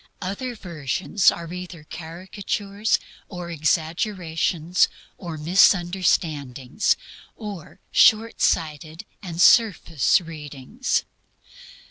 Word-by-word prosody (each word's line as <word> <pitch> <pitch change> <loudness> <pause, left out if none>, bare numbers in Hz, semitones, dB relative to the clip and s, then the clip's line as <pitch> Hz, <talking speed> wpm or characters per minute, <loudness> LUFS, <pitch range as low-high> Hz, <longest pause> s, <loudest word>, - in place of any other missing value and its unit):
Other 200 +7 -4
versions 175 - +1
are 170 0 -7
either 180 -3 -8
caricatures, 195 +5 -3 0.3
or 175 -2 -7
exaggerations, 165 +1 0 0.3
or 170 -4 -6
misunderstandings, 170 - +2 0.4
or 205 -7 -9
shortsighted 165 -8 +2 0.2
and 170 -4 -7
surface 180 - +4
readings. 155 - -3
175 Hz, 70 wpm, -23 LUFS, 160-195 Hz, 0.4 s, surface